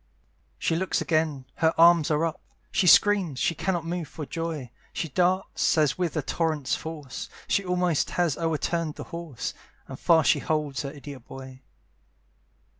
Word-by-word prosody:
She 165 - 0
looks 185 +3 0
again 155 -5 0
her 160 -1 +2
arms 170 -2 +6
are 155 +1 +2
up 165 - -4 0.3
She 190 -1 +2
screams 190 -6 +5
she 165 - +1
cannot 175 -1 -1
move 170 -1 -3
for 150 +2 -7
joy; 160 -6 -4 0.2
She 165 - -3
darts 180 +3 +1
as 150 -3 +3
with 175 -3 -2
a 150 - 0
torrent's 155 -3 -1
force, 150 -5 -7 0.2
She 200 - +2
almost 180 -3 +1
has 175 -5 +2
o'erturned 165 0 -1
the - - -7
horse, 170 -7 -5 0.3
And 135 - -8
fast 165 -3 +5
she 150 - +1
holds 150 -3 -1
her 140 - -4
idiot 140 -4 -10
boy. 130 -1 -10
160 Hz, 160 wpm, -26 LUFS, 145-170 Hz, 0.3 s, arms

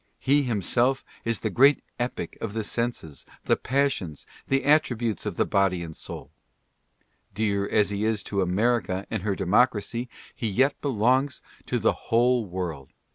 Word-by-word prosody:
He 140 +2 +3
himself 125 +2 +1 0.2
is 115 -2 -1
the - - -1
great 140 +3 +5 0.2
Epic 120 +1 -3
of 110 -3 -4
the 110 0 -2
senses, 115 - -3 0.2
the - - +4
passions, 130 - -1 0.2
the 135 0 +1
at 150 +2 +6
tributes 115 - -3
of - - -3
the - - +2
body 95 -3 +1
and 80 -1 -8
soul. - - -8 1.0
Dear 100 -2 0
as 105 -1 +2
he 100 +1 -2
is 110 -2 0
to 100 -1 -1
America 95 +1 0
and 110 -3 -2
her 100 0 -1
democracy, 120 +4 +1 0.2
he 115 - -3
yet 130 +8 +2
belongs 130 +1 +1 0.2
to - - 0
the - - +2 0.2
whole 120 -1 +3
world. 85 -7 -5
110 Hz, 160 wpm, -26 LUFS, 100-125 Hz, 1.0 s, at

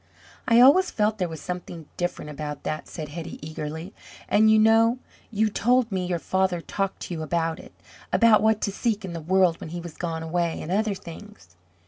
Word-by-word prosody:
"I 230 0 +5
always 295 +9 +7
felt 215 0 0
there 180 -2 -1
was 160 -2 -8
something 180 -3 -6
different 175 -3 -3
about 150 0 -6
that," 155 - -4
said 155 -3 -7
Hetty 165 +2 -7
eagerly, 160 +4 -6 0.3
"and 215 +1 +4
you 220 - +6
know 225 +2 +4 0.3
you 220 0 +1
told 240 +3 +2
me 185 -2 -1
your 175 -1 0
father 190 +1 0
talked 195 +3 -3
to - - -5
you 160 - -4
about 165 +1 -1
it - - -14 0.4
about 230 -2 +5
what 220 0 +2
to 200 - 0
seek 215 0 -1
in 180 - -6
the 165 - -5
world 180 0 +2
when - - -7
he 175 +2 -5
was 170 -2 -8
gone 165 -2 -3
away, 170 0 -1
and 160 - -6
other 210 +1 +1
things." 175 - -12
180 Hz, 200 wpm, -25 LUFS, 165-215 Hz, 0.4 s, always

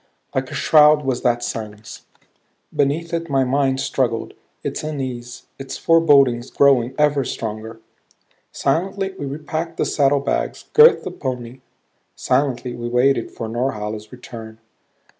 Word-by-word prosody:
Like 130 0 -2
a - - -7
shroud 150 -1 +5
was 130 -2 -1
that 120 -1 +1
silence. 105 -1 -7 0.7
Beneath 155 +5 0
it 165 0 -2
my 135 -1 +2
mind 135 0 +1
struggled, 125 -4 -1 0.3
its - - -4
unease, 125 -5 -5
its 135 0 -6
forebodings 140 -7 +4
growing 130 -3 +3
ever 150 -2 +2
stronger. 110 -1 -5 0.7
Silently 190 +6 -1
we 145 - -4
repacked 155 +3 -4
the - - +1
saddlebags; 140 -1 0
girthed 455 +2 +7
the - - -5
pony; 125 -2 -5 0.6
silently 130 -2 0
we 120 0 -5
waited 125 0 +2
for 115 - -6
Norhala's 110 -3 -3
return. 115 -3 -10
135 Hz, 125 wpm, -20 LUFS, 120-145 Hz, 0.7 s, girthed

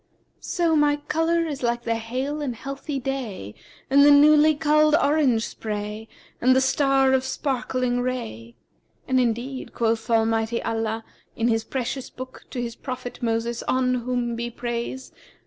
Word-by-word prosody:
'So 335 -2 0
my 295 -1 +4
colour 325 +3 0
is 290 -4 -5
like 240 -1 0
the 230 - 0
hale 255 +6 -3
and 260 -5 -3
healthy 275 +3 -5
day 235 - -4 0.3
and 280 +1 +5
the 290 - +7
newly 300 +1 +6
culled 305 0 +4
orange 280 -7 +2
spray 210 0 -5 0.3
and 255 +1 +5
the - - +5
star 270 0 +3
of 260 -1 +2
sparkling 255 -2 -1
ray;[FN#357] 120 - -4 0.5
and 260 0 +3
indeed 250 +2 -2
quoth 225 -1 0
Almighty 225 0 +1
Allah, 225 0 -2 0.3
in 230 +1 +1
His 225 -1 +1
precious 260 +1 -4
Book, 255 0 -10
to 250 - -5
his 235 -1 -4
prophet 255 -2 -7
Moses 230 0 -1
(on 255 0 +2
whom 245 -1 -1
be 235 +1 -3
peace!) 240 +2 -5
255 Hz, 150 wpm, -24 LUFS, 230-275 Hz, 0.5 s, the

